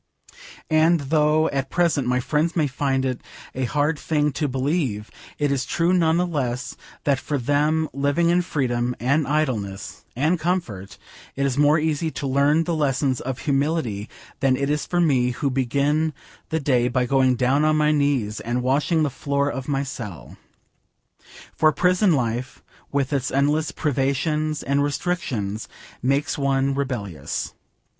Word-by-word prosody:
And, 160 +2 +4
though 150 +2 +2
at 135 -1 -2
present 165 -7 +1
my 125 0 +2
friends 150 +6 0
may 160 -3 +2
find 135 -1 -1
it 130 -2 -2 0.3
a 130 0 -1
hard 145 +4 0
thing 150 -2 0
to 150 +2 -1
believe, 130 -5 -1 0.3
it 145 -1 0
is 135 -2 0
true 170 +7 +1
none 165 -2 +3
the 180 - +2
less, 130 -5 -3 0.3
that 140 -2 +2
for 145 +1 -2
them 150 +4 +1
living 145 +5 +1
in 175 +1 +3
freedom 125 -7 -1
and 140 +5 +1
idleness 120 -10 -2
and 155 +7 +1
comfort 125 - -3 0.4
it 140 - 0
is 135 -2 0
more 145 +2 +4
easy 160 0 0
to 145 - -5
learn 140 +4 +3
the 170 - -2
lessons 135 -4 0
of 130 0 -4
humility 140 -7 -1 0.3
than 130 -1 +2
it 140 +1 0
is 150 0 -1
for 175 - 0
me, 135 -7 +3
who 140 +3 -1
begin 140 +5 +1 0.4
the 160 - 0
day 125 -4 +2
by 125 0 +1
going 130 -1 +3
down 130 +4 +2
on 155 0 +3
my 150 0 +3
knees 140 -8 0
and 120 +2 -2
washing 150 +5 +2
the 145 - 0
floor 140 +1 -1
of 135 -1 -6
my 140 -1 0
cell. 110 - -8 1.2
For 155 -1 +4
prison 180 +5 +3
life 125 -1 -2 0.3
with 140 0 0
its 130 -2 0
endless 145 +3 +1
privations 150 +2 -1
and 140 +1 +1
restrictions 135 - -2 0.3
makes 140 +4 0
one 135 0 +1
rebellious. 105 - -3
140 Hz, 160 wpm, -23 LUFS, 130-155 Hz, 1.2 s, And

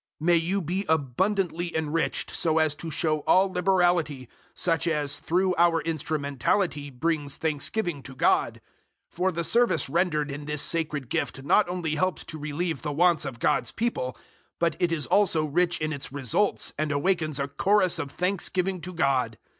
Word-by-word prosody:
009:011 155 - -5
May 175 - +6
you 180 +4 0
be 185 +5 -2
abundantly 170 - 0
enriched 160 +1 -1
so 160 -1 +1
as 155 -2 +3
to 155 +3 -7
show 155 0 0
all 190 +1 +4
liberality, 175 -7 +1 0.3
such 165 -1 0
as 145 -3 0
through 180 +4 +1
our 170 -1 +4
instrumentality 150 0 -1
brings 145 +1 -2
thanksgiving 160 +1 -2
to 130 0 -10
God. - - +1 0.5
009:012 - - -24
For 185 +2 +1
the 170 0 -3
service 230 - +2
rendered 150 -2 0
in 145 +1 -6
this 150 -1 0
sacred 155 -5 -1
gift 135 - -3
not 175 +7 +3
only 175 -4 -2
helps 185 0 0
to 155 - -9
relieve 155 +3 -3
the 150 - -3
wants 165 +1 +3
of 135 -4 -5
God's - - +1
people, 220 - -2 0.4
but 170 -2 +1
it 175 -1 +1
is 160 -3 0
also 170 -6 +3
rich 175 +4 +1
in 155 0 -2
its 140 -3 -5
results 145 - 0
and 155 -1 0
awakens 155 -1 0
a 140 - -1
chorus 185 +4 +2
of 145 -3 -3
thanksgiving 185 +1 -1
to 180 +1 -7
God. 130 -8 +1
160 Hz, 170 wpm, -26 LUFS, 145-180 Hz, 0.5 s, May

